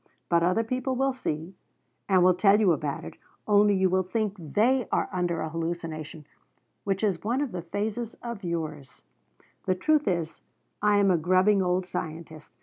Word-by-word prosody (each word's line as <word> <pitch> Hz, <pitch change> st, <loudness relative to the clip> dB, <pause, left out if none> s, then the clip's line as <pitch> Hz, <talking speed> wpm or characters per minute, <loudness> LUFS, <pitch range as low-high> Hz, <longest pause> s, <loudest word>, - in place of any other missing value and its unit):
But 170 Hz, -1 st, +3 dB
other 180 Hz, +6 st, +2 dB
people 255 Hz, +3 st, -2 dB
will 270 Hz, +1 st, +1 dB
see, 170 Hz, -9 st, -4 dB, 0.6 s
and 185 Hz, -2 st, +5 dB
will 185 Hz, 0 st, +6 dB
tell 195 Hz, +3 st, +4 dB
you 200 Hz, -5 st, +4 dB
about 150 Hz, -2 st, -2 dB
it, -, -, -10 dB, 0.3 s
only 205 Hz, -1 st, +5 dB
you 190 Hz, 0 st, +3 dB
will 185 Hz, +1 st, +2 dB
think 205 Hz, +2 st, -2 dB
they 220 Hz, -, +1 dB
are -, -, +1 dB
under 175 Hz, -2 st, -1 dB
a 160 Hz, -, -3 dB
hallucination, 165 Hz, -2 st, -5 dB, 0.6 s
which 195 Hz, +1 st, -1 dB
is 195 Hz, -5 st, +1 dB
one 235 Hz, +5 st, 0 dB
of 285 Hz, -4 st, -2 dB
the 180 Hz, -2 st, -4 dB
phases 215 Hz, +6 st, -4 dB
of 235 Hz, -4 st, -6 dB
yours. 155 Hz, -5 st, -5 dB, 0.6 s
The 185 Hz, -, +2 dB
truth 300 Hz, +10 st, +2 dB
is 170 Hz, -4 st, -2 dB, 0.4 s
I 210 Hz, 0 st, +4 dB
am 200 Hz, -1 st, +4 dB
a 175 Hz, -, +3 dB
grubbing 185 Hz, +4 st, +3 dB
old 180 Hz, 0 st, 0 dB
scientist. 160 Hz, -3 st, -7 dB
185 Hz, 175 wpm, -27 LUFS, 170-210 Hz, 0.6 s, will